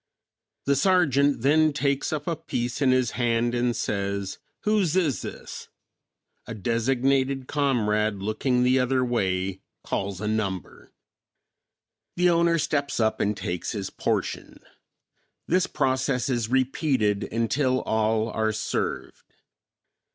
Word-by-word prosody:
The 140 - +3
sergeant 140 -6 +3
then 155 +2 +4
takes 140 -1 0
up 150 -2 -3
a 170 - -1
piece 125 -6 -3
in 135 - +4
his 130 -3 +2
hand 120 -1 0
and 120 -1 +1
says, 100 -3 -2 0.2
"Whose 205 -6 +1
is 165 -9 +1
this?" - - -8 0.8
A 115 - -5
designated 130 +5 0
comrade 110 -7 +1
looking 110 +6 0
the 130 +1 +4
other 130 0 +1
way 95 -5 -1 0.2
calls 95 -1 -3
a 105 - -3
number. 100 -4 -3 1.2
The 180 0 +3
owner 170 0 +3
steps 145 -3 -1
up 110 -1 +1
and 105 0 0
takes 90 +5 -3
his 100 -3 -4
portion. - - -3 0.9
This 180 +2 +2
process 130 -1 0
is 120 -4 -1
repeated 130 -5 +1
until 125 +3 +1
all 110 0 0
are 110 0 0
served. - - -4
125 Hz, 120 wpm, -25 LUFS, 110-140 Hz, 1.2 s, then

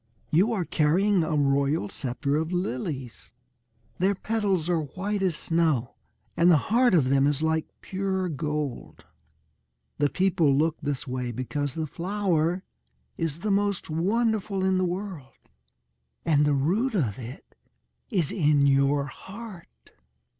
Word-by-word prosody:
You 190 +9 +4
are 195 -6 -1
carrying 180 +7 +2
a 155 0 -1
royal 140 -3 +2
sceptre 140 +5 -2
of 160 +2 -2
lilies. 130 - -4 0.7
Their 195 +3 +2
petals 200 -5 -1
are 175 -2 +2
white 190 +8 -3
as 185 -4 +1
snow, 155 -8 0 0.4
and 170 +1 +4
the 165 - +7 0.2
heart 245 -4 +5
of 135 -6 +3
them 135 +1 +4
is 145 +1 0
like 160 0 +1
pure 190 -1 -2
gold. 150 -4 -4 0.9
The 145 0 +3
people 170 -6 +2
look 160 +2 +1
this 145 0 -3
way 125 -1 -3
because 130 +3 -3
the 160 -1 -2
flower 180 0 -1 0.5
is 165 -1 -3
the 210 0 0
most 200 -4 0
wonderful 200 +3 0
in 190 -1 +2
the 185 - +2
world. 175 -7 -5 0.9
And 150 -3 +3
the 145 - +3
root 205 - +1
of 125 - 0
it 125 +3 -10 0.6
is 180 - 0
in 145 -5 +3
your 140 +1 +3
heart." 190 +6 -11
165 Hz, 140 wpm, -26 LUFS, 140-190 Hz, 0.9 s, the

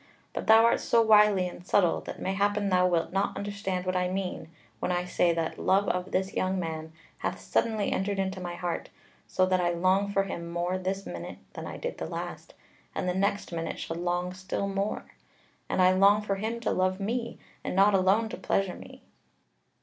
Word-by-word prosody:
But - - -4
thou 225 +1 +8
art 235 - +4
so 235 - +2
wily 210 -4 +5
and 175 - -9
subtle 180 -1 +2
that - - -8
mayhappen 200 +1 0
thou 180 -1 +4
wilt 170 -2 0
not 195 +1 0
understand 200 -2 -3
what 185 0 -1
I 180 0 +1
mean, 185 -3 -3 0.3
when - - -1
I 180 0 0
say 175 -1 +2
that 165 -1 -2
love 195 +2 +3
of 180 +1 -1
this 190 +1 0
young 185 0 0
man 160 -2 -4 0.3
hath - - -3
suddenly 220 -3 0
entered 200 +1 -1
into 190 -1 -2
my 175 -1 -4
heart, 175 -1 -3 0.4
so 185 - +2
that 185 0 +2
I 175 - +2
long 185 +4 +2
for 195 -1 +2
him 170 -3 -5
more 175 +2 -1
this 190 +1 -3
minute - - -7 0.2
than - - -6
I - - -6
did - - -5
the - - -3
last, - - -6 0.4
and - - -2
the 180 - +1
next 200 +1 0
minute 165 -1 -3
shall 165 - -4
long 175 +1 -1
still 185 +1 -3
more. 195 +1 -2 0.6
And 185 - +2
I 185 - +6
long 200 +3 +5
for 195 -1 -1
him 225 +3 -3
to 235 - 0
love 185 +1 +1
me, 235 +4 -2 0.3
and - - -3
not 200 +2 +5
alone 195 +4 +3
to 250 - -6
pleasure 195 -2 0
me." - - -12
190 Hz, 205 wpm, -28 LUFS, 180-200 Hz, 0.6 s, thou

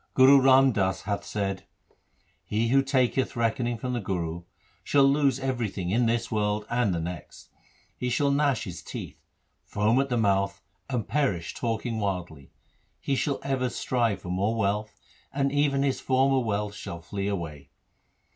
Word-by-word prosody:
Guru 135 +1 +7
Ram 135 0 +6
Das 95 -4 -1
hath 100 0 -2
said: 95 -2 -3 0.4
— - - -44 0.3
He 115 +2 -1
who 135 +2 +5
taketh 130 -1 +1
reckoning 120 +1 0
from 125 +2 -4
the 120 - -1
Guru, 85 -4 -3 0.4
shall 140 -1 +3
lose 135 -1 +3
everything 115 -9 -2
in 120 +3 +2
this 115 0 -1
world 105 -1 0
and 120 -4 +2
the 85 - -1
next. 85 +1 -7 0.4
He 125 - -3
shall 140 +3 +2
gnash 140 -4 +1
his 90 -3 -7
teeth, - - -8 0.4
foam 110 +5 +2
at 140 - -3
the 120 - 0
mouth, 100 -2 +1 0.3
and 125 -5 -2
perish 115 - 0
talking 115 -1 -2
wildly. 90 -8 -4 0.5
He 140 - -1
shall 140 +1 -1
ever 130 -2 0
strive 120 -5 -1
for 90 - -7
more 100 +5 0
wealth, 105 0 -1 0.3
and 140 0 0
even 140 -1 +2
his 135 -2 0
former 135 +1 +3
wealth 105 -3 -2
shall 85 -4 -7
flee 100 +3 -4
away. 80 -8 -5
115 Hz, 165 wpm, -27 LUFS, 100-130 Hz, 0.5 s, Guru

